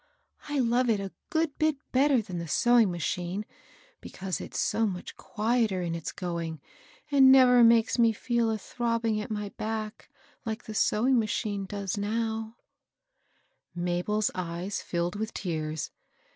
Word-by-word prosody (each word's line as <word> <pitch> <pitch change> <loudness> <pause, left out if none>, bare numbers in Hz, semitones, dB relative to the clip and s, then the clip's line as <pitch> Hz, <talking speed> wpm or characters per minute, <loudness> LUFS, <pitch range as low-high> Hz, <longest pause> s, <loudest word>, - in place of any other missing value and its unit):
I 290 - -1
love 245 -1 +2
it 215 -3 +2
a 195 -1 -5 0.2
good 320 -2 0
bit 310 -1 +2 0.2
better 265 -2 +3
than 185 -4 -6
idle 170 0 -4
sewing 240 +5 +4
machine, 175 +3 -3 0.5
because 190 -1 -5
it's - - -5
so 225 0 +1
much 180 -3 -6
qtdeteir 215 -4 0
in 165 - -2
its 165 -2 -4
going, 170 -3 -4 0.5
and 270 -2 +7
never 250 -2 +7
makes 230 +1 +4
me 230 -1 +5
fed 235 +3 -3
a 220 -1 0
tabbing 230 0 -1
at - - -9
my 210 -2 -3
back 215 0 -4 0.3
like 225 0 -4
the 220 - -7
sewing 240 +4 +3
madmie 210 -2 -2
does 200 0 -3
now/' 220 +1 -2 1.2
Mabel's 180 +5 0
ey^ 180 +2 -4
filled 175 +3 -2
vi^th 220 0 -3
teare. 155 -5 -3
215 Hz, 145 wpm, -28 LUFS, 180-235 Hz, 1.2 s, and